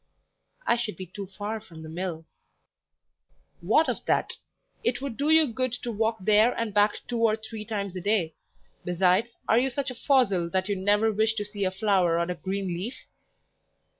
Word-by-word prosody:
"I 235 Hz, -, +3 dB
should 230 Hz, -3 st, -3 dB
be 185 Hz, -, -6 dB
too 195 Hz, +2 st, -8 dB
far 205 Hz, +3 st, -5 dB
from 165 Hz, -7 st, -12 dB
the -, -, -8 dB
mill." 165 Hz, 0 st, -4 dB, 1.3 s
"What 225 Hz, -, +3 dB
of -, -, -2 dB
that? -, -, +1 dB, 0.5 s
It 245 Hz, 0 st, 0 dB
would 270 Hz, -3 st, -5 dB
do 285 Hz, +4 st, 0 dB
you 320 Hz, 0 st, +6 dB
good 255 Hz, -1 st, -2 dB
to 245 Hz, -1 st, -4 dB
walk 225 Hz, +1 st, 0 dB
there 215 Hz, +5 st, +4 dB
and 230 Hz, -3 st, -2 dB
back 205 Hz, +1 st, +4 dB
two 240 Hz, -1 st, -2 dB
or 225 Hz, -2 st, +4 dB
three 220 Hz, 0 st, -7 dB
times 200 Hz, -4 st, -3 dB
a 185 Hz, -, -4 dB
day; 195 Hz, -5 st, +1 dB, 0.5 s
besides, 180 Hz, +5 st, +2 dB, 0.2 s
are 225 Hz, -, +5 dB
you 265 Hz, +2 st, +1 dB
such 270 Hz, +1 st, -3 dB
a -, -, -6 dB
fossil 230 Hz, -, +2 dB
that 185 Hz, +2 st, 0 dB
you 205 Hz, -, 0 dB
never 205 Hz, +3 st, +2 dB
wish 220 Hz, +1 st, +1 dB
to 210 Hz, -, -2 dB
see 205 Hz, -1 st, -3 dB
a -, -, +2 dB
flower 190 Hz, -4 st, +2 dB
or 170 Hz, +1 st, -1 dB
a -, -, 0 dB
green 190 Hz, +4 st, -3 dB
leaf?" 180 Hz, +8 st, -3 dB
210 Hz, 195 wpm, -27 LUFS, 185-230 Hz, 1.3 s, you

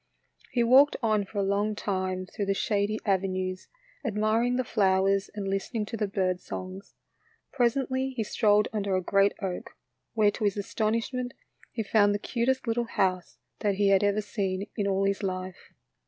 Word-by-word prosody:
He 240 Hz, -, +1 dB
walked 265 Hz, +5 st, +6 dB
on 215 Hz, -2 st, +2 dB
for 205 Hz, -, -10 dB
a 200 Hz, -, +2 dB
long 205 Hz, +2 st, 0 dB
time 185 Hz, -2 st, -2 dB
through 200 Hz, +2 st, -4 dB
the 195 Hz, -, +1 dB
shady 205 Hz, +1 st, 0 dB
avenues, 185 Hz, -2 st, -1 dB, 0.4 s
admiring 220 Hz, +3 st, +1 dB
the 255 Hz, -, +1 dB
flowers 195 Hz, -2 st, +2 dB
and 200 Hz, -2 st, -4 dB
listen 195 Hz, +4 st, -3 dB
ing 215 Hz, -2 st, 0 dB
to 230 Hz, -, -6 dB
the 210 Hz, -2 st, -1 dB
bird 185 Hz, -2 st, 0 dB
songs. 185 Hz, +2 st, -8 dB, 0.6 s
Presently 260 Hz, +1 st, +1 dB
he 250 Hz, -4 st, -3 dB
strolled 210 Hz, 0 st, +3 dB
under 200 Hz, -3 st, 0 dB
a 185 Hz, -, 0 dB
great 195 Hz, +2 st, +3 dB
oak, 185 Hz, -2 st, -5 dB, 0.4 s
where 210 Hz, -2 st, +4 dB
to 215 Hz, -, -6 dB
his 205 Hz, 0 st, +1 dB
astonishment 230 Hz, +5 st, -2 dB, 0.4 s
he 225 Hz, -, -3 dB
found 205 Hz, -1 st, +3 dB
the -, -, +1 dB
cutest 260 Hz, +5 st, -1 dB
little 235 Hz, +1 st, 0 dB
house 185 Hz, -, -1 dB, 0.2 s
that 205 Hz, -2 st, +1 dB
he 200 Hz, 0 st, +2 dB
had 195 Hz, 0 st, +4 dB
ever 205 Hz, +1 st, +2 dB
seen 195 Hz, -2 st, -2 dB
in 205 Hz, -2 st, -1 dB
all 195 Hz, 0 st, +1 dB
his 195 Hz, +1 st, 0 dB
life. 185 Hz, -1 st, -5 dB
205 Hz, 175 wpm, -28 LUFS, 195-225 Hz, 0.6 s, walked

